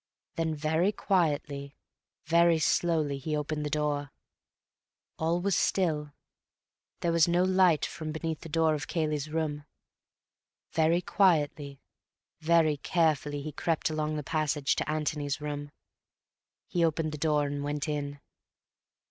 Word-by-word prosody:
Then 160 -1 -1
very 160 +6 +1
quietly, 150 -8 -1 0.5
very 170 +1 +4
slowly 155 -3 +1
he 150 +2 -2
opened 150 0 -3
the 150 - -2
door. 145 -1 -1 1.1
All 165 +2 +1
was 195 +1 +1
still. 150 -6 0 0.9
There 170 - +1
was 165 -1 +4
no 175 +1 +3
light 185 -5 +4
from 155 -1 -5
beneath 160 0 -3
the 165 - -10
door 160 0 +2
of 150 0 -3
Cayley's 155 -3 -1
room. 155 -2 -2 1.1
Very 165 +2 +2
quietly, 145 -7 +1 0.6
very 160 -2 +3
carefully 150 -3 0
he 155 - -5
crept 160 +2 -1
along 155 0 -1
the 150 - -3
passage 150 -2 0
to - - -2
Antony's 150 -2 -1
room. 145 -1 -5 1.0
He 175 - 0
opened 160 -1 +1
the 150 - -6
door 150 -1 +2
and 145 0 -3
went 145 0 -2
in. 145 -1 -3
155 Hz, 130 wpm, -29 LUFS, 145-165 Hz, 1.1 s, very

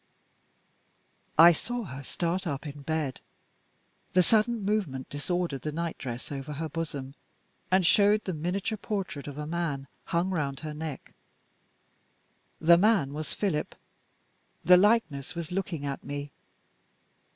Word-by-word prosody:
I 170 +2 +10
saw 240 +8 -3
her 135 -8 -7
start 175 +6 -2
up 140 0 -3
in 145 -1 -7
bed. 150 -3 -2 0.9
The 180 0 +6
sudden 220 +2 +2
movement 190 -11 -1
disordered 165 -1 -2
the 150 - -3
nightdress 150 -7 -4
over 140 +1 -5
her 160 +3 -3
bosom 145 -4 -4 0.6
and 185 -1 +4
showed 205 +3 +5
the 185 - -2
miniature 180 +7 -2
portrait 195 -11 -3
of 145 -1 -7
a 150 - -4
man, 155 -4 -2 0.2
hung 175 +3 0
round 140 -6 -2
her 155 -1 -5
neck. 155 -2 -6 1.5
The 170 +1 +6
man 195 -9 +3
was 155 +1 -4
Philip. 185 -8 -1 0.9
The 180 - +9
likeness 180 - +2
was 170 -1 -5
looking 180 -5 -2
at 140 -1 -4
me. 145 0 -5
165 Hz, 130 wpm, -28 LUFS, 145-185 Hz, 1.5 s, I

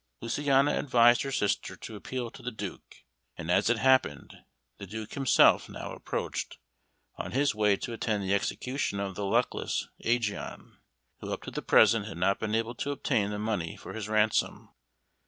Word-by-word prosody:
Luciana 140 +3 +2
advised 120 -3 +5
her 135 - -3
sister 105 -6 -1
to 110 - -9
appeal 120 +3 -5
to - - -13
the 125 - -3
Duke, 110 - -8 0.3
and 80 - -3
as 100 +5 +3
it 120 - +3
happened, 130 - +2 0.4
the 100 - -8
Duke 110 +2 -7
himself 135 -3 +4
now - - -7
approached, - - -4 0.6
on - - -5
his 140 +1 +2
way 105 -2 +3
to 120 - -5
attend 110 -3 -1
the 95 +1 0
execution 125 +1 -1
of 100 -1 -3
the 100 +2 -4
luckless 120 +5 0
Ægeon, 115 -3 -2 0.5
who - - -6
up - - -4
to - - -7
the - - -4
present - - +4
had - - -7
not 95 +3 +1
been 110 0 -1
able 115 +1 -1
to 140 - -4
obtain 110 -7 0
the 105 - -3
money 105 -6 -2
for - - -10
his 105 -2 -5
ransom. 110 0 +1
110 Hz, 175 wpm, -29 LUFS, 100-125 Hz, 0.6 s, advised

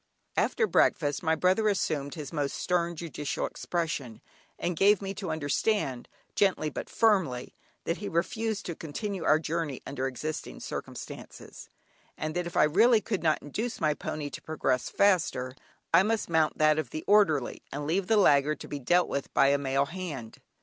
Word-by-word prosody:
After 465 - +2
breakfast, 150 - +2
my 160 -1 +2
brother 185 +6 +2
assumed 150 -8 -1
his 150 -1 -7
most 145 -3 -1
stern 170 -1 0
judicial 155 -3 -3
expression 155 -9 -3 0.4
and 175 0 -2
gave 200 +3 +5
me 195 -1 -4
to 190 -3 -5
understand 145 - 0 0.3
gently 185 -6 +2
but - - -6
firmly, 185 - +1 0.3
that 170 - -1
he 205 - -5
refused 215 +5 -1
to 170 - -3
continue 190 +5 -4
our - - +5
journey 160 -3 -3
under 135 -1 -2
existing 150 +5 -5
circumstances, - - -8 0.5
and 155 0 -3
that 175 -1 -1
if 175 +1 -5
I - - +6
really 215 +10 +5
could 210 -2 -3
not 155 -2 +1
induce 220 - -4
my 155 -1 +2
pony 150 -1 -5
to - - -7
progress 135 -5 -1
faster, 160 -10 +2 0.4
I 165 - +8
must 215 -2 -1
mount 160 -1 +2
that 155 0 +4
of 145 -6 -3
the 155 - -5
orderly, 195 -11 +3
and 145 +1 -4
leave 180 +5 0
the 225 - +4
laggard 150 -5 +4
to - - -7
be 145 - -5
dealt 175 +7 +3
with 140 - -3
by 140 - +5
a 140 0 +3
male 135 0 +1
hand. 155 -9 -7
160 Hz, 175 wpm, -28 LUFS, 145-190 Hz, 0.5 s, I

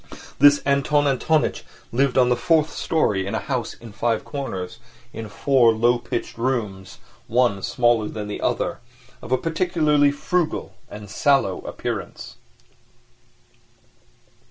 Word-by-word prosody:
This 145 +1 +6
Anton 145 +1 +2
Antonitch 150 +3 +1 0.3
lived 135 +2 +1
on 125 -1 +5
the 125 - +3
fourth 160 +2 +2
storey 105 - 0
in - - -3
a - - 0
house 130 -4 -3
in 115 -2 -12
Five 115 +1 -1
Corners, 115 -10 -5 0.3
in 110 -1 -7
four 125 +1 +3
low 120 +2 +2
pitched 120 -1 -5
rooms, 105 -7 -3 0.3
one 115 -4 +2
smaller 120 -1 +1
than 105 -1 -6
the 105 - -5
other, - - -1 0.4
of - - -10
a 130 - +4
particularly 155 -2 +2
frugal 165 +3 -2 0.2
and 105 0 -9
sallow 105 -2 +1
appearance. - - -6
125 Hz, 130 wpm, -22 LUFS, 110-145 Hz, 0.4 s, This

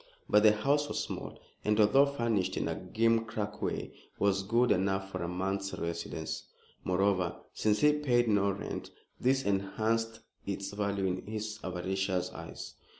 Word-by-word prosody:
But 105 - +5
the 105 0 +7
house 140 +7 +1
was - - -2
small, - - -5 0.3
and, 105 +1 +2
although 120 +7 +6
furnished 115 -9 0
in - - 0
a - - 0
gimcrack 110 -2 0
way, - - -2 0.3
was 100 -1 +2
good 115 +5 +2
enough 95 +1 +1
for - - -4
a 85 - -2
month's 95 +2 -2
residence. 85 0 -4 0.4
Moreover, 95 -1 +1 0.2
since 105 -1 +1
he 150 0 +6
paid 125 -5 +2
no 100 -2 +3
rent, 100 +1 -4 0.3
this 135 +2 +2
enhanced 110 +3 0 0.2
its 100 0 -4
value 100 -1 -1
in 95 +1 -2
his 110 0 -4
avaricious 95 0 -1
eyes. - - -8
105 Hz, 150 wpm, -31 LUFS, 95-115 Hz, 0.4 s, the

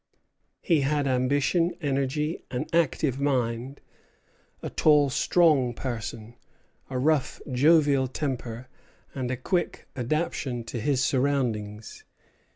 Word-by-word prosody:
He 165 -5 +3
had 145 +1 +1
ambition, 140 +6 +1
energy, 145 +2 -1
an 125 - -3
active 155 -4 +1
mind, 130 -1 -1 0.8
a - - -4
tall, 145 -3 +4
strong 140 -7 +3
person, 115 -2 -5 0.6
a 130 - -3
rough, 140 0 +1
jovial 145 0 +4
temper, 130 -3 -4 0.5
and 130 -2 -3
a 130 - -2
quick 175 +7 -2
adaptation 130 -2 -2
to 115 +1 -5
his 130 +2 +1
surroundings. 120 -6 -1
135 Hz, 105 wpm, -26 LUFS, 125-150 Hz, 0.8 s, tall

